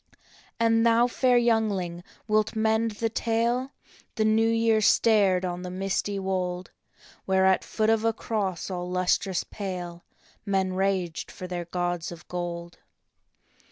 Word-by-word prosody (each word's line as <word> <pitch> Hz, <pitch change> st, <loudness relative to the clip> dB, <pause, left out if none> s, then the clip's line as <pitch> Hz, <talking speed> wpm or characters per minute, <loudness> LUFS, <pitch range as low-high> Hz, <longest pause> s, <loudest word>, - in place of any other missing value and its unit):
" -, -, -28 dB
And 225 Hz, 0 st, +3 dB
thou, 230 Hz, +1 st, +4 dB
fair 245 Hz, 0 st, +2 dB
youngling, 205 Hz, -7 st, 0 dB, 0.2 s
wilt 215 Hz, +1 st, +1 dB
mend 220 Hz, +1 st, +2 dB
the 225 Hz, +2 st, -1 dB
tale? 235 Hz, +3 st, 0 dB, 0.2 s
" -, -, -28 dB
The 220 Hz, -, +1 dB
New 220 Hz, +1 st, +3 dB
Year 225 Hz, -1 st, +2 dB
stared 200 Hz, -5 st, +4 dB
on 175 Hz, 0 st, -4 dB
the 180 Hz, -, -6 dB
misty 195 Hz, +2 st, -2 dB
wold, 185 Hz, -2 st, -3 dB, 0.5 s
Where 190 Hz, 0 st, +3 dB
at 190 Hz, 0 st, +3 dB
foot 220 Hz, 0 st, 0 dB
of 225 Hz, -1 st, +1 dB
a 225 Hz, -, +3 dB
cross 200 Hz, -5 st, -3 dB
all 180 Hz, -1 st, -4 dB
lustrous 185 Hz, +1 st, 0 dB
pale 180 Hz, -4 st, -6 dB, 0.4 s
Men 190 Hz, -2 st, 0 dB
raged 185 Hz, -3 st, -1 dB
for 185 Hz, -, -8 dB
their 175 Hz, -1 st, -4 dB
gods 175 Hz, 0 st, -2 dB
of 170 Hz, -1 st, -11 dB
gold. 175 Hz, -1 st, -5 dB
195 Hz, 150 wpm, -26 LUFS, 180-225 Hz, 0.5 s, thou